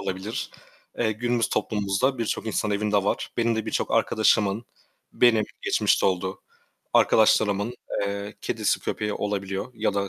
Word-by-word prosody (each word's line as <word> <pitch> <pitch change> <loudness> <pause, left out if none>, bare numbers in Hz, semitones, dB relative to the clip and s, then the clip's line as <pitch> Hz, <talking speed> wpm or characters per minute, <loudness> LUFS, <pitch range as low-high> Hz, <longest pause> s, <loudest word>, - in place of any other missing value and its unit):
olabilir. 95 +4 -4 0.5
Eee, 110 -2 +1
günümüz 120 +2 0
toplumumuzda 105 +5 0
birçok 115 -1 -2
insan 105 -1 -1
evinde 105 -1 +1
var. - - -1
Benim 115 -1 +1
de 110 0 -3
birçok 110 - -1
arkadaşımın 110 0 +2 0.5
Benim 115 -3 +4 0.2
geçmişte - - +2
oldu, 95 0 -1 0.5
arkadaşlarımın, 105 0 +3 0.3
eee, 100 +1 -4
kedisi, - - 0
köpeği 105 0 -2
olabiliyor 100 0 -3
ya 110 -3 -1
da, 100 0 -1
105 Hz, 130 wpm, -25 LUFS, 100-110 Hz, 0.5 s, Benim